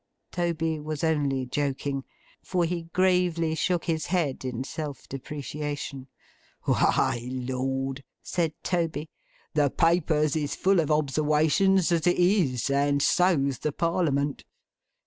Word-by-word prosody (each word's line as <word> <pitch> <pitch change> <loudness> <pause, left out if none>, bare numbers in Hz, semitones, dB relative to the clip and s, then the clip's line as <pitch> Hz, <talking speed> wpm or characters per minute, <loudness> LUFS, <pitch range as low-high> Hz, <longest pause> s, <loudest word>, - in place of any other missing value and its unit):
Toby 165 -2 -1
was 155 0 -5
only 145 -5 +1
joking, 135 0 -2 0.4
for 180 -2 0
he 170 0 -3
gravely 180 -3 +2
shook 170 +2 0
his 160 -2 -1
head 165 -9 -1
in 130 -1 -3
self 145 0 -6
depreciation. 145 0 -5 0.6
'Why! 120 +1 +1
Lord!' 130 +1 -2 0.2
said 165 -3 -1
Toby. 160 -4 -1 0.4
'The 145 -2 +3
Papers 160 -2 +2
is 150 -2 -1
full 190 -1 +3
of 155 - 0
obserwations 155 +5 +2
as 170 0 +2
it 175 - +3
is; 170 - +2
and 140 +1 +2
so's 140 -5 +2
the 150 - -1
Parliament. 150 -3 0
150 Hz, 120 wpm, -27 LUFS, 140-170 Hz, 0.6 s, The